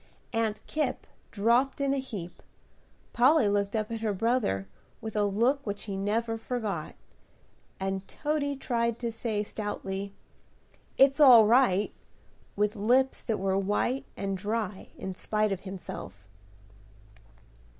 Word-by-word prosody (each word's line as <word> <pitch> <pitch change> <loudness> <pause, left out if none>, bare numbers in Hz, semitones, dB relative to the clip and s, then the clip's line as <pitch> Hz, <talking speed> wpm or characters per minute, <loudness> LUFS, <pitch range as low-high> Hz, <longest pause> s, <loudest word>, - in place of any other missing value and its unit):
Aunt 225 -2 -1
Kipp 305 0 -2 0.2
dropped 235 +7 +2
in 275 -1 +1
a 275 - 0
heap, 205 -10 -7 0.7
Polly 255 0 +5
looked 200 +1 0
up 215 0 -1
at 225 -1 -4
her 215 -3 0
brother, 220 - 0 0.3
with 220 -1 -7
a 210 -1 +2
look 235 +8 +1
which 205 -3 -4
he 200 -2 -4
never 225 +3 -1
forgot; 225 -3 -3 0.8
and 195 0 -3
Toady 290 -2 -1
tried 235 -3 -1
to 235 -1 -3
say, 220 -2 -2
stoutly, 200 -2 -5 0.8
"It's 275 +2 +5
all 250 -7 +9
right!" 215 -4 +3 0.6
with 210 +2 +1
lips 250 +6 +2
that 225 -3 -1
were 195 0 +1
white 205 +7 0
and 195 -1 -2
dry 210 0 -3
in 190 - -5
spite 215 +3 0
of 195 - -1
himself. 135 - -8
215 Hz, 130 wpm, -28 LUFS, 200-245 Hz, 0.8 s, all